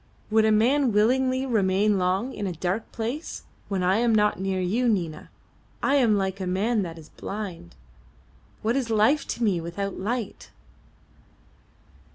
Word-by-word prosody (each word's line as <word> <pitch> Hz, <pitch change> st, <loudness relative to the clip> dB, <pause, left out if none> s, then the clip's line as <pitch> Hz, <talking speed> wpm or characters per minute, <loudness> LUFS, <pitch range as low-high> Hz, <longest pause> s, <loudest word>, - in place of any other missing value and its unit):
"Would 220 Hz, 0 st, +4 dB
a 220 Hz, -, +4 dB
man 250 Hz, +5 st, +3 dB
willingly 255 Hz, +5 st, +2 dB
remain 205 Hz, -3 st, +2 dB
long 190 Hz, +8 st, 0 dB
in 205 Hz, -, -3 dB
a 180 Hz, -, -3 dB
dark 180 Hz, +6 st, -3 dB
place? 240 Hz, +8 st, -4 dB, 0.2 s
When 195 Hz, -2 st, -1 dB
I 185 Hz, +3 st, +3 dB
am 230 Hz, -1 st, +3 dB
not 210 Hz, -2 st, +2 dB
near 190 Hz, 0 st, -1 dB
you, 220 Hz, +7 st, +1 dB
Nina, 175 Hz, -7 st, -2 dB, 0.5 s
I 275 Hz, -, +2 dB
am 230 Hz, -6 st, +4 dB
like 190 Hz, 0 st, -2 dB
a 185 Hz, -, -2 dB
man 210 Hz, +5 st, +1 dB
that 170 Hz, -3 st, -5 dB
is 155 Hz, -2 st, -13 dB
blind. 190 Hz, -, -7 dB, 0.9 s
What 225 Hz, +3 st, +1 dB
is 260 Hz, -4 st, -1 dB
life 225 Hz, +7 st, +3 dB
to 240 Hz, -, -3 dB
me 190 Hz, -6 st, +2 dB
without 195 Hz, +4 st, -4 dB
light?" 225 Hz, +2 st, -4 dB
210 Hz, 160 wpm, -25 LUFS, 190-235 Hz, 0.9 s, Would